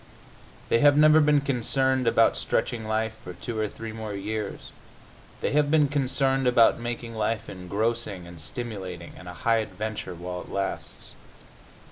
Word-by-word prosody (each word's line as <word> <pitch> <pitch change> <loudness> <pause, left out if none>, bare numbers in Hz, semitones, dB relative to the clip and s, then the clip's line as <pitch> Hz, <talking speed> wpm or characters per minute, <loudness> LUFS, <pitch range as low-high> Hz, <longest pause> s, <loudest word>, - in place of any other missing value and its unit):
They 115 - +4
have 145 +1 +6
never 155 +1 +7
been 150 -1 +4
concerned 130 -1 +1
about - - +4
stretching 110 -2 -1
life 110 0 0
for 90 - -7
two 110 +5 -5
or 110 - +1
three 110 +1 -8
more 110 -2 -5
years; 105 +1 -4 0.7
they - - 0
have 145 0 +3
been 150 -1 +4
concerned 135 -1 +1
about 120 -2 +5
making 120 0 -5
life 110 0 -1
engrossing 100 +1 -3
and 85 -2 -11
stimulating 95 -3 -6
and 90 - -12
a - - -7
high 115 -1 +4
adventure 105 -2 -4
while 90 +1 -5
it - - -12
lasts. 100 0 -4
115 Hz, 155 wpm, -26 LUFS, 100-130 Hz, 0.7 s, never